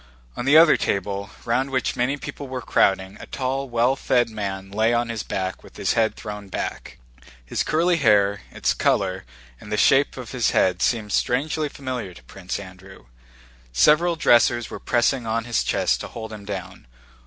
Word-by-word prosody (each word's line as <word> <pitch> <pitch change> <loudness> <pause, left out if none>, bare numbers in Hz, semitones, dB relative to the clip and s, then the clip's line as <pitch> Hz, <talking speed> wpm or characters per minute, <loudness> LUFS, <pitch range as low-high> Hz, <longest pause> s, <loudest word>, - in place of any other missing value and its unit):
On 120 - -4
the 145 +3 +6
other 165 -1 +7
table, 100 0 -2 0.2
round 130 +3 0
which 130 -2 -1
many 125 +4 0
people 140 0 -7
were 130 -1 -5
crowding, 95 +1 +1
a - - -10
tall 135 0 -3
well 120 +2 +2
fed 120 -3 +1
man 95 -2 -5
lay 110 +3 +2
on 120 0 0
his 115 -2 -3
back 95 0 -4
with - - -15
his - - 0
head 110 -1 +1
thrown 105 -1 -8
back. 95 - -5 0.5
His - - -2
curly 170 +2 +2
hair, 100 -7 +3
its - - 0
color, 95 -4 0 0.3
and 105 - -12
the 105 - 0
shape 135 +5 +3
of 125 -4 -7
his 125 -3 +1
head 95 -1 +2
seemed 110 -4 0
strangely 150 +4 0
familiar 130 -10 -6
to - - -15
Prince 95 0 -6
Andrew. 95 -5 -13 0.7
Several 165 - +4
dressers 120 -5 +3
were - - -6
pressing 120 0 +1
on 115 +1 0
his 120 0 0
chest - - +1
to - - -6
hold 110 -1 -8
him 105 -2 -9
down. 95 -7 -7
115 Hz, 180 wpm, -23 LUFS, 100-130 Hz, 0.7 s, other